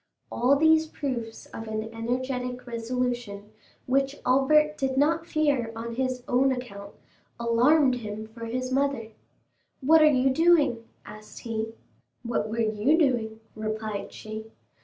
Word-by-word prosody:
All 255 +4 +3
these 315 +2 +4
proofs 245 -7 -5
of 225 - -7
an 215 0 -2
energetic 250 +2 -3
resolution, 235 -3 -3 0.3
which 270 +2 +1
Albert 300 +4 +4
did 265 -2 -2
not 325 +4 +2
fear 290 -8 +1
on 230 +1 -5
his 255 0 -2
own 265 +2 +3
account, 205 -6 -6 0.4
alarmed 255 +5 +4
him 215 -2 -6
for 230 +1 -9
his 255 +2 -3
mother. 270 -4 0 0.7
"What 315 +4 +5
are - - +7
you 265 -1 +3
doing?" 290 -6 +3 0.2
asked 215 0 -11
he. 225 -1 -4 0.5
"What 230 -3 -1
were 225 +2 -3
you 220 +7 +2
doing?" 230 -8 0
replied 215 -1 -4
she. 220 +1 -8
250 Hz, 135 wpm, -26 LUFS, 225-275 Hz, 0.7 s, are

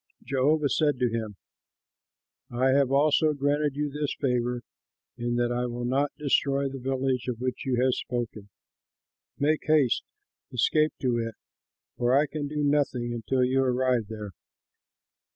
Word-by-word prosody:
Jehovah 145 +2 +2
said 145 -2 +2
to 125 -2 +1
him, 110 -3 -3 1.1
"I 125 +2 +1
have 140 -1 +3
also 150 +2 +3
granted 145 0 0
you 145 0 -2
this 145 0 -2
favor, 125 -2 0 0.5
in 120 0 -2
that 120 0 +1
I 125 +1 -1
will 120 0 -4
not 135 +4 +1
destroy 140 -1 +1
the 135 0 -6
village 130 -1 -1
of 120 -2 -3
which 130 +1 -3
you 125 -2 +1
have 130 -1 +3
spoken. 115 -5 -4 0.9
Make 150 +2 +1
haste, 150 -6 +3 0.5
escape 155 +5 +2
to 125 -3 +1
it, 115 -1 -4 0.6
for 120 +1 +3
I 145 - +4
can 150 0 -4
do 150 0 -2
nothing 140 -5 +1
until 125 +3 0
you 130 +1 +2
arrive 125 -3 +1
there." 105 -2 -6
130 Hz, 150 wpm, -27 LUFS, 120-145 Hz, 1.1 s, I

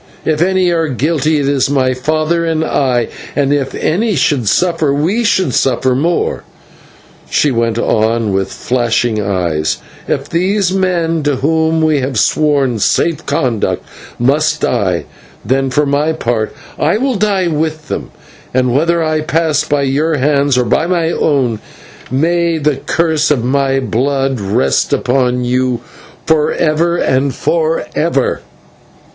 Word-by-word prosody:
If 155 0 0
any 185 0 +2
are 165 -1 +1
guilty 155 +3 0
it 140 -2 0
is 140 -2 +1
my 130 -2 +1
father 155 +6 0
and 160 -1 0
I, 125 -6 +1 0.3
and 145 -1 +2
if 140 -2 -1
any 205 +6 0
should 135 -5 +1
suffer 165 -5 +1
we 170 +12 0
should 185 - +1
suffer. 130 0 +1
More," 165 +7 0 0.9
she 150 - +2
went 115 -2 0
on, 110 -2 +1
with 95 0 -1
flashing 120 -2 0
eyes, 90 -6 -1 0.3
"if - - -2
these 185 +2 0
men 170 -4 0
to 145 -1 0
whom 160 +3 +1
we 155 -2 +2
have 130 -2 -2
sworn 140 -1 +1
safe 165 +10 0
conduct 125 -6 -1 0.3
must 150 +5 +1
die, 95 -8 0 0.4
then 135 +4 +1
for 145 +3 +1
my 145 +3 +1
part 115 -7 -1 0.3
I 160 +7 +2
will 265 +3 0
die 200 -3 +1
with 155 -1 -2
them, - - -4 0.5
and 125 -1 +2
whether 165 +4 +2
I 155 -1 0
pass 155 -2 +1
by 145 -2 0
your 150 +4 +1
hands 140 -1 +2
or 125 - +2
by 160 - +1
my 170 -2 0
own, 130 -10 0 0.5
may 170 +5 +1
the 150 -2 0
curse 160 -2 0
of 140 -6 +1
my 135 +1 +1
blood 135 +1 -1
rest 95 -9 +1
upon 125 -1 +1
you 125 0 0 0.4
for 155 -2 +2
ever 170 +2 +1
and 135 -3 0
for 160 -5 0
ever." 150 -4 0
145 Hz, 145 wpm, -14 LUFS, 125-160 Hz, 0.9 s, any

